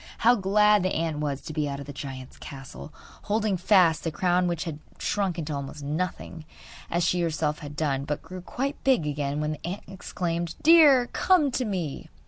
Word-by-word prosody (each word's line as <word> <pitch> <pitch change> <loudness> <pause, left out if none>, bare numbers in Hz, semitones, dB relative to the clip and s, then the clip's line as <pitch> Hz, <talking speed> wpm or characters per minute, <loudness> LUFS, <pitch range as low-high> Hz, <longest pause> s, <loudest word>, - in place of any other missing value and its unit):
How 240 - +8
glad 210 0 +4
the 185 +1 0
ant 160 -2 -1
was 145 -2 -2
to 155 - -8
be 150 -1 -1
out 140 0 -4
of 140 - -7
the 145 - -8
giant's 135 -2 -8
castle, 135 +2 -10 0.3
holding 210 -1 +1
fast 180 -3 +4
the 165 - -1
crown 180 +3 +1
which 170 -2 -1
had 160 -4 -6 0.2
shrunk 195 -4 -1
into 155 -2 -3
almost 140 +1 -6
nothing, 160 +2 -4 0.5
as 175 +1 0
she 180 0 +1
herself 155 -2 -1
had 145 -1 -8
done, 140 -3 -1
but 150 0 -3
grew 185 0 -8
quite 275 +10 -4
big 260 - +3
again 145 -1 -2
when 150 0 -1
the 155 - -7
ant 190 +4 -5
exclaimed: 175 -3 -4
'Deer, 300 -6 +7
come 335 -7 +3
to 250 0 -1
me! 180 -9 -4
170 Hz, 195 wpm, -26 LUFS, 150-195 Hz, 0.5 s, How